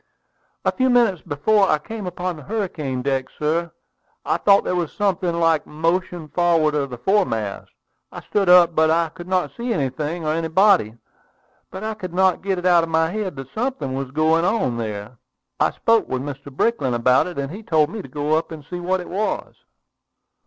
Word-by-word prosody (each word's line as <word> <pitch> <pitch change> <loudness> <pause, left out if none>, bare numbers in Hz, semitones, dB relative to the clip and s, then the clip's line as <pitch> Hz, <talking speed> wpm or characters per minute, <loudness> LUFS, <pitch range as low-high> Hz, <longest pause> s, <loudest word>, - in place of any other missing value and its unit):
"A - - +3
few 260 -1 +1
minutes 235 -8 +3
before 195 +6 +2
I - - +4
came 205 +6 -7
upon 180 0 -3
the 155 - -11
hurricane 155 - -3
deck, 135 -1 -1
sir, 165 +3 -1 0.5
I - - +1
thought 200 -1 +4
there 180 - -1
was 175 -3 -1
something 185 -4 -1
like 165 -2 +2
motion 165 +1 -2
forward 165 -1 +2
of 140 -2 -1
the 125 - -7
foremast. 115 - 0 0.4
I - - -8
stood 200 -3 0
up, 175 -1 +7
but 160 0 +3
I 165 0 +2
could 175 +3 -11
not 185 -1 0
see 240 +1 -3
anything 150 - -2
or 155 - +1
anybody. 165 - +3 0.7
But 190 +2 -8
I 220 0 -2
could 185 -5 -8
not 190 -1 +3
get 195 -1 -1
it 180 - -5
out 175 -2 +5
of 165 - -3
my 160 0 +1
head 210 -2 -3
that 135 0 -9
something 245 - -2
was 135 -1 -3
going 160 +4 +2
on 175 - 0
there. 110 +1 -6 0.4
I - - +3
spoke 230 -1 +1
to - - -1
Mr. 140 +1 -6
Brickland 135 - 0
about 125 +5 +3
it, 180 - -8
and 140 0 -3
he 200 +5 -8
told 155 -7 +1
me 215 0 -5
to - - -11
go 145 +3 -2
up 160 +1 -2
and 155 -3 -9
see 180 - -5
what 185 +1 -1
it 180 - -9
was." 205 +3 -2
165 Hz, 200 wpm, -21 LUFS, 145-190 Hz, 0.7 s, up